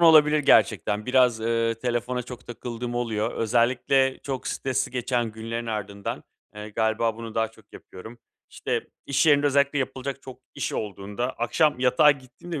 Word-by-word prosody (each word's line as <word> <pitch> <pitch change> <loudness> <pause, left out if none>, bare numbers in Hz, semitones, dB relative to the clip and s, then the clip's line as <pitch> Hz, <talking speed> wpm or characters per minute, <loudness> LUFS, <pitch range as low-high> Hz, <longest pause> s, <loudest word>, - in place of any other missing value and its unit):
olabilir 155 -2 +7
gerçekten. 105 -5 +3
Biraz, 125 -3 +3
ııı, 115 0 +1
telefona 120 +1 -2
çok 125 0 -10
takıldığım 120 0 -6
oluyor. 115 -2 -1
Özellikle 125 +3 +2
çok 135 -2 -4
stresli 130 -2 -1
geçen 120 -2 -1
günlerin 115 +1 -5
ardından, 100 -2 -4 0.3
eee, 105 0 -7
galiba 110 +1 0
bunu 115 -1 -8
daha 115 -1 +1
çok 110 -2 -22
yapıyorum. 110 +6 -12 0.3
İşte, - - -3 0.2
iş 140 +2 +2
yerinde 145 -1 +5
özellikle 140 +1 +2
yapılacak 135 +1 -4
çok 130 -2 -10 0.2
iş - - -3
olduğunda, 105 +4 -3
akşam 125 +4 +1
yatağa 130 +4 +5
gittiğimde 145 +4 -6
120 Hz, 150 wpm, -25 LUFS, 110-130 Hz, 0.3 s, olabilir